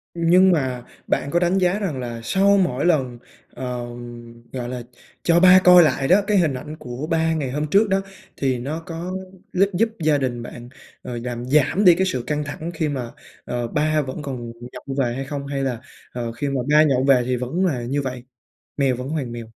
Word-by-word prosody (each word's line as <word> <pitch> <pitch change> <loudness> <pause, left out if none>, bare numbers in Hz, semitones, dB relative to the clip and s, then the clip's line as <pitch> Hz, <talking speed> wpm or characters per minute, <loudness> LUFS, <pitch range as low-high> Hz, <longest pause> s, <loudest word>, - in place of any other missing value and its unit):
Nhưng 175 +3 +5
mà 130 -7 -1 0.2
bạn 140 - 0
có 175 - +3
đánh 175 +2 +2
giá 185 +2 +2
rằng 165 -10 -3
là 120 -2 -5
sau 195 +9 +3
mỗi 145 -6 0
lần, 130 -8 +1 0.4
ờ, 125 -2 -4 0.7
gọi 125 -2 -4
là, 125 -1 -5 0.4
cho 170 0 +4
ba 185 +1 +8
coi 180 -1 +8
lại 140 -3 +1
đó, 190 +6 +5
cái 210 -1 +3
hình 160 -6 +2
ảnh 150 +4 -7
của 125 +5 -6
ba 165 0 +1
ngày 145 -5 -2
hôm 150 +3 -2
trước 200 +6 +3
đó, 195 0 +2 0.4
thì 130 -3 0
nó 145 +6 -4
có 170 +2 -6 0.4
lúp 195 +2 +2
giúp 225 +5 +2
gia 155 -2 +2
đình 120 -3 -2
bạn, 120 0 -10 0.3
ờ, 120 -1 -6
làm 120 -1 -4
giảm 150 +9 +2
đi 175 - +8
cái 190 +2 +1
sự 130 -10 -2
căng 150 0 -1
thẳng 155 +4 -6
khi 155 -2 -1
mà, 125 -5 -4 0.3
ờ, 120 -1 -3
ba 155 +2 +1
vẫn 135 +2 -6
còn 125 -5 -6 0.2
nhậu 135 +2 -7
về 120 -3 +1
hay 135 +1 -4
không? 140 0 -5
Hay 140 -1 -2
là, 125 -4 -2 0.3
ờ, 120 -1 -4
khi 130 +5 -4
mà 135 -2 -1
ba 150 +1 +6
nhậu 135 -4 +2
về 135 -2 +5
thì 125 0 0
vẫn 130 +10 -1
là 135 -9 0
như 135 +4 -1
vậy, 130 -2 -5 0.5
mèo 135 -3 +2
vẫn 125 +2 -6
hoàn 145 -6 -3
mèo? 120 -1 -6
140 Hz, 220 wpm, -22 LUFS, 125-170 Hz, 0.7 s, ba